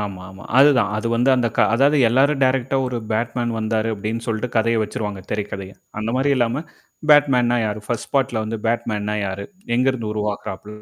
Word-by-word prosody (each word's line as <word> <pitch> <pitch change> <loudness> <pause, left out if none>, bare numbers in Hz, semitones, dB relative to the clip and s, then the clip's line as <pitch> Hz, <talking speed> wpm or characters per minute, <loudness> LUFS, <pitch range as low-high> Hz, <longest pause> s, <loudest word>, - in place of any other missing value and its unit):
ஆமாமா, 95 -1 -7
அதுதான் 135 -8 +5
அது 110 +2 -3
வந்து 125 +3 +3
அந்த 120 -2 +1
க - - -12 0.2
அதாவது 140 +4 +4
எல்லாரும் 135 +4 +2
டைரக்ட்டா 130 +1 +1
ஒரு 125 -1 -3 0.2
பேட்மேன் 120 +1 -1
வந்தாரு 110 0 -1
அப்படின்னு 110 +3 -4
சொல்லட்டு 115 +2 -2
கதைய 115 0 +2
வச்சுருவாங்க 105 -2 -4
திரைக்கதைய. 100 -2 -4 0.3
அந்த 110 +1 -2
மாரி 135 +2 +1
இல்லாம 125 +4 0 0.5
பேட்மேன்னா 130 -5 +5
யாரு? 105 0 -3
பர்ஸ்ட் 120 - -4
பார்ட்ல 120 -5 +1
வந்து 110 +1 -3
பேட்மேன்னா 105 -2 -1
யாரு? 95 +1 -5 0.3
எங்கருந்து 125 -4 0
உருவாகறாப் 105 -2 -4
115 Hz, 160 wpm, -21 LUFS, 105-125 Hz, 0.5 s, அதுதான்